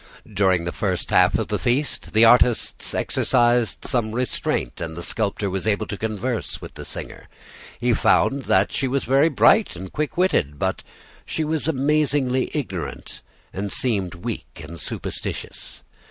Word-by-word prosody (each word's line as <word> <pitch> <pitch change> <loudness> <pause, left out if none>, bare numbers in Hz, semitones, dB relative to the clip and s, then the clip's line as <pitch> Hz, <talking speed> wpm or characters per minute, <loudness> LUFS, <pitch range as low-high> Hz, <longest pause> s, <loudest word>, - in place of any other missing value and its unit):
During 95 -5 +2
the 85 - -3
first 95 -4 -2
half 90 0 +5
of - - -3
the 105 -2 -1
feast 125 +10 -1
the 110 +2 +6
artists 120 0 +3
exercised 120 -2 +1
some 115 -4 0
restraint, 120 - -1
and 80 -1 -5
the 85 - -4
sculptor 105 0 -1
was 95 +1 -3
able 110 0 +1
to 105 - -5
converse 110 +3 -3
with - - -10
the - - -9
singer. - - -7 0.5
He 120 0 +2
found 135 +4 +2
that 95 +1 +3
she 135 - 0
was 135 +1 0
very 135 +6 +4
bright 200 - +4
and 95 +1 -8
quick 150 +2 -3
witted; 75 - +1
but - - -2 0.4
she 160 - -2
was 155 0 -1
amazingly 140 -3 +1
ignorant 95 - -5 0.3
and 100 +1 -4
seemed 100 -9 -1
weak 100 -2 -6
and 85 +2 -9
superstitious. - - -6
115 Hz, 155 wpm, -23 LUFS, 95-130 Hz, 0.5 s, the